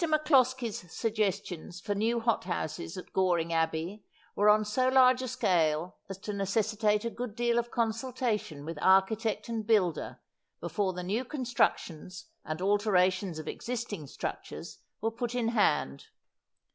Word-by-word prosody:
MacCloskie's 260 Hz, -, +2 dB
suggestions 195 Hz, -6 st, -2 dB
for 205 Hz, -, -2 dB
new 225 Hz, +4 st, +1 dB
hot 230 Hz, -4 st, 0 dB
houses 165 Hz, -1 st, -4 dB
at 185 Hz, -, -9 dB
Goring 175 Hz, -3 st, +1 dB
Abbey 165 Hz, +5 st, -1 dB, 0.3 s
were 205 Hz, +1 st, +4 dB
on 215 Hz, 0 st, +5 dB
so 255 Hz, +5 st, +1 dB
large 255 Hz, -1 st, +5 dB
a 260 Hz, -, -3 dB
scale 180 Hz, -9 st, +1 dB
as 195 Hz, -, -5 dB
to 205 Hz, +2 st, -5 dB
necessitate 210 Hz, +2 st, +1 dB
a 230 Hz, -, -1 dB
good 240 Hz, -3 st, -5 dB
deal 240 Hz, 0 st, +2 dB
of 240 Hz, 0 st, -3 dB
consultation 230 Hz, -, -2 dB
with 165 Hz, -1 st, -5 dB
architect 200 Hz, +4 st, +3 dB
and 230 Hz, -2 st, -2 dB
builder 195 Hz, -7 st, +1 dB, 0.4 s
before 195 Hz, -3 st, -1 dB
the 180 Hz, 0 st, -5 dB
new 210 Hz, +7 st, -1 dB
construc 250 Hz, -2 st, +1 dB
tions 180 Hz, +3 st, -10 dB, 0.2 s
and 155 Hz, +4 st, -4 dB
alterations 190 Hz, -3 st, +2 dB
of 155 Hz, -, -7 dB
existing 230 Hz, -, -4 dB
structures -, -, -6 dB, 0.2 s
were 225 Hz, +1 st, 0 dB
put 240 Hz, +1 st, -4 dB
in 235 Hz, -2 st, +1 dB
hand. 150 Hz, -, +1 dB
210 Hz, 145 wpm, -30 LUFS, 180-235 Hz, 0.4 s, on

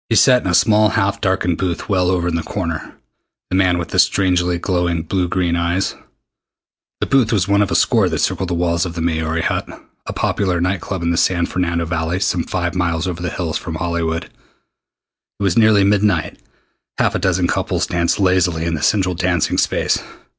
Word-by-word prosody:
He 115 Hz, -, +2 dB
sat 125 Hz, +1 st, +5 dB
in -, -, -5 dB
a 90 Hz, -, +2 dB
small 105 Hz, +3 st, +4 dB
half 100 Hz, +3 st, 0 dB
darkened 95 Hz, -3 st, 0 dB
booth 90 Hz, -3 st, -2 dB
well 90 Hz, -3 st, +1 dB
over 90 Hz, -2 st, 0 dB
in 85 Hz, -, -1 dB
the 85 Hz, -, 0 dB
corner 85 Hz, -2 st, -5 dB, 0.6 s
the -, -, +1 dB
man 90 Hz, -2 st, +3 dB
with 85 Hz, -, -4 dB
the -, -, 0 dB
strangely 90 Hz, -2 st, +2 dB
glowing 85 Hz, -2 st, -1 dB
blue 90 Hz, +2 st, -1 dB
green 85 Hz, -1 st, 0 dB
eyes. 85 Hz, +3 st, 0 dB, 1.1 s
The -, -, +1 dB
booth 135 Hz, -5 st, +2 dB
was 100 Hz, -5 st, +1 dB
one 100 Hz, 0 st, +3 dB
of 100 Hz, -, +1 dB
a -, -, -1 dB
score -, -, +3 dB
that -, -, -2 dB
circled 95 Hz, -, -1 dB
the 90 Hz, -, -1 dB
walls 85 Hz, 0 st, 0 dB
of 90 Hz, -3 st, -5 dB
the 85 Hz, -, -3 dB
"Maori 80 Hz, 0 st, -1 dB
Hut," -, -, -1 dB, 0.4 s
a -, -, -3 dB
popular 95 Hz, -4 st, -1 dB
night 90 Hz, +1 st, -1 dB
club 95 Hz, -4 st, -4 dB
in 85 Hz, -, +1 dB
the 85 Hz, -, 0 dB
San 85 Hz, -1 st, +2 dB
Fernando 85 Hz, -2 st, -1 dB
Valley 80 Hz, +2 st, -2 dB
some 90 Hz, -3 st, 0 dB
five 85 Hz, -2 st, -2 dB
miles 85 Hz, -2 st, -1 dB
over 90 Hz, -2 st, -4 dB
the 90 Hz, -, -2 dB
hills 80 Hz, -3 st, -3 dB
from 80 Hz, -3 st, -6 dB
Hollywood. 85 Hz, -1 st, -2 dB
It 100 Hz, -, -17 dB
was 95 Hz, -4 st, +1 dB
nearly 110 Hz, -3 st, +5 dB
midnight. 100 Hz, -4 st, +1 dB, 0.6 s
Half -, -, +1 dB
a -, -, -1 dB
dozen -, -, +1 dB
couples -, -, -1 dB
danced 85 Hz, +2 st, 0 dB
lazily 90 Hz, -4 st, +1 dB
in 85 Hz, -, -1 dB
the 80 Hz, -, -3 dB
central 95 Hz, +2 st, +1 dB
dancing 90 Hz, -2 st, 0 dB
space. -, -, +1 dB
90 Hz, 205 wpm, -18 LUFS, 85-95 Hz, 1.1 s, sat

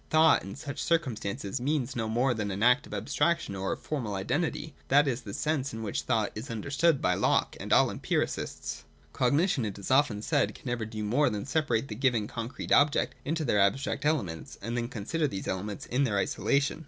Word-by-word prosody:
Thought 155 Hz, -1 st, +5 dB
in 95 Hz, +1 st, -7 dB
such 145 Hz, 0 st, -6 dB
circumstances 120 Hz, -, -1 dB
means 135 Hz, -2 st, -1 dB
no 115 Hz, -2 st, -2 dB
more 125 Hz, +3 st, +2 dB
than 105 Hz, -3 st, -2 dB
an 100 Hz, +2 st, -2 dB
act 125 Hz, +4 st, +4 dB
of -, -, -10 dB
abstraction 145 Hz, +4 st, 0 dB
or 95 Hz, 0 st, -2 dB
of -, -, -8 dB
formal 120 Hz, -10 st, -3 dB
identity. 155 Hz, -, -2 dB
That 145 Hz, +2 st, +5 dB
is 130 Hz, -1 st, -1 dB
the 100 Hz, -, -8 dB
sense 145 Hz, -4 st, -1 dB
in 110 Hz, -, -5 dB
which 105 Hz, -, -2 dB
thought 110 Hz, -4 st, 0 dB
is 110 Hz, +6 st, -7 dB
understood 140 Hz, +7 st, +1 dB
by 90 Hz, -, +3 dB
Locke -, -, +1 dB
and -, -, -6 dB
all -, -, +5 dB
empiricists. -, -, -2 dB, 0.3 s
Cognition, 140 Hz, +2 st, +2 dB
it 105 Hz, -2 st, -4 dB
is 100 Hz, +5 st, -5 dB
often 130 Hz, -6 st, +3 dB
said, 145 Hz, +2 st, +1 dB
can -, -, -15 dB
never 120 Hz, -3 st, -2 dB
do 110 Hz, -1 st, -5 dB
more 125 Hz, +8 st, +3 dB
than 105 Hz, -1 st, -4 dB
separate 135 Hz, -5 st, 0 dB
the 110 Hz, -, -5 dB
given 120 Hz, -2 st, +1 dB
concrete 115 Hz, +3 st, -6 dB
objects 145 Hz, 0 st, +4 dB
into 160 Hz, +1 st, -1 dB
their 105 Hz, -5 st, +2 dB
abstract 130 Hz, +8 st, +1 dB
elements, 115 Hz, -, -1 dB
and 115 Hz, +4 st, -4 dB
then 120 Hz, -1 st, -1 dB
con 110 Hz, -6 st, -6 dB
sider 165 Hz, +2 st, +1 dB
these 95 Hz, -8 st, -5 dB
elements 100 Hz, +2 st, -3 dB
in 130 Hz, +3 st, +1 dB
their 110 Hz, -6 st, +1 dB
isolation. 140 Hz, +9 st, +1 dB
125 Hz, 205 wpm, -29 LUFS, 105-145 Hz, 0.3 s, Thought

